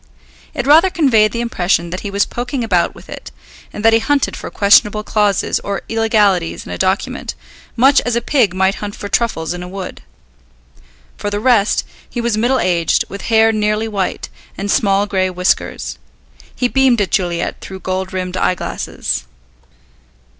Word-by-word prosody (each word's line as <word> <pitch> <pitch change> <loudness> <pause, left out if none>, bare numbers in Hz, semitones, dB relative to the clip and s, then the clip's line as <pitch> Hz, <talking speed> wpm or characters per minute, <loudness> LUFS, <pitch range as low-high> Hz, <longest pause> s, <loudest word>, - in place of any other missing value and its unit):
It 265 -4 -2
rather 320 +6 +6
conveyed 235 - +3
the 235 - -3
impression 175 -6 0
that 185 - -4
he 205 - -5
was 200 0 +1
poking 245 +1 -4
about 225 - +1
with - - -14
it, - - -9 0.4
and 210 - -6
that 225 - +6
he 225 - +5
hunted 280 +4 0
for - - -7
questionable 210 +1 +4
clauses 210 -3 +1
or 200 0 -4
illegalities 210 -6 +1
in - - -8
a - - -4
document, 190 +1 -1 0.4
much 270 +4 +5
as 245 -1 -2
a - - +2
pig 235 -6 +1
might 190 +1 +2
hunt 205 -1 -5
for 205 - -6
truffles 200 -8 -1
in 180 - -6
a 180 - -6
wood. 190 0 -7 1.2
For 205 - -3
the 205 0 -2
rest, 220 -3 +2 0.2
he 240 - -5
was 235 -2 0
middle 245 +4 +1
aged, 175 -2 +1
with 200 0 -7
hair 225 0 +5
nearly 215 0 0
white, 200 -4 -3 0.3
and 200 +1 -2
small 200 -1 +2
grey 190 -2 0
whiskers. 180 0 -1 0.6
He 250 - +1
beamed 260 -2 +3
at 205 - -1
Juliet 175 -3 -1
through 190 -1 -9
gold 185 0 -3
rimmed 185 -1 -4
eyeglasses. 180 - -2
205 Hz, 170 wpm, -17 LUFS, 190-235 Hz, 1.2 s, rather